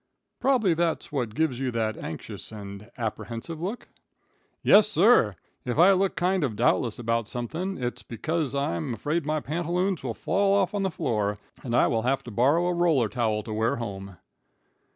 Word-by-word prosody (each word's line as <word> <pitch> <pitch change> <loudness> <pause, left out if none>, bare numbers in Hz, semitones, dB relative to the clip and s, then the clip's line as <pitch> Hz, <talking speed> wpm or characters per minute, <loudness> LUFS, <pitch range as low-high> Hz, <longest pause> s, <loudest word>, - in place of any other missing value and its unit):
"Probably 245 -10 +3
that's 165 -1 -1
what 120 -7 -2
gives 155 -5 0
you 135 -1 -1
that 110 -2 -1
anxious 80 +6 -7
and 100 -1 -9
apprehensive 120 +6 -5
look?" 200 +8 -4 0.8
"Yes, 210 +1 +7
sir. 195 - +4 0.3
If 125 +1 -3
I 175 +4 +7
look 195 0 +2
kind 185 0 +1
of 120 -7 -1
doubtless 120 0 +1
about 115 -2 -1
something, 160 - -4
its 125 -1 -3
because 145 +5 -3
I'm 120 - -1
afraid 150 +7 -2
my 155 0 +1
pantaloons 175 +5 -1
will 120 -4 -3
fall 200 0 +1
off 195 -1 +1
on 205 - -1
the 190 - +1
floor 105 - -1 0.2
and 120 -2 -2
I - - +5
will 115 - +1
have 130 +3 0
to 120 - -9
borrow 140 +11 +3
a 180 - +1
roller 165 -10 +2
towel 110 -3 -1
to 110 - -6
wear 115 +5 +1
home." 100 -5 -6
135 Hz, 175 wpm, -26 LUFS, 115-175 Hz, 0.8 s, Yes